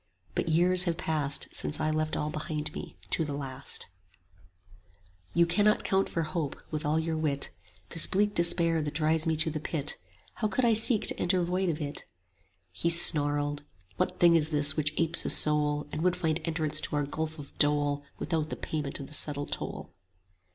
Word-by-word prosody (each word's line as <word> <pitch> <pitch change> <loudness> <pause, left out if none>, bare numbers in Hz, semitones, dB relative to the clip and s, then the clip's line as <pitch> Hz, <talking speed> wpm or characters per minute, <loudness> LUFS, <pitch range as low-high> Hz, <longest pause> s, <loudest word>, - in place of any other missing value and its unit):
But - - -2
years 180 +3 +3
have 170 -2 -1
passed 150 -3 0
Since 150 - -2
I 155 0 0
left 155 0 -2
all 150 0 -2
behind 155 0 -4
me, - - -9
to 165 - +4
the 145 -2 -4
last: 135 -2 -4 1.5
You 170 - +5
cannot 205 +5 +2
count 195 0 0
for 165 - -2
hope, 155 -3 -3 0.2
with 155 0 -4
all 150 +2 +1
your 160 0 -1
wit, 150 -3 -2 0.4
This 165 - +4
bleak 205 +2 +1
despair 170 -2 +3
that 150 -1 -5
drives 160 +1 +1
me 160 - +1
to 160 +1 +1
the 155 - -4
Pit: 150 -1 -3 0.4
How 215 - +2
could 250 +4 0
I 230 - +4
seek 225 0 +4
to - - +4
enter 180 0 +1
void 180 +1 -1
of 160 -1 -2
it? 145 -1 -5
30 - - -15 0.7
He 130 - -2
snarled, 145 -3 +4 0.4
What 180 - -1
thing 170 -1 +6
is 155 -2 +2
this 145 -2 +3
which 150 -1 0
apes 165 0 +2
a - - -2
soul, 150 -1 +3
And 155 - -4
would 180 +1 +1
find 165 -3 -2
entrance 155 -2 0
to - - -3
our 145 - 0
gulf 160 +2 -4
of 145 -2 -11
dole 145 -1 +2
Without 155 -1 -2
the - - -4
payment 150 -3 -4
of 140 - -7
the 145 - -14
settled 145 -1 -1
toll? - - -5
155 Hz, 195 wpm, -28 LUFS, 150-170 Hz, 1.5 s, thing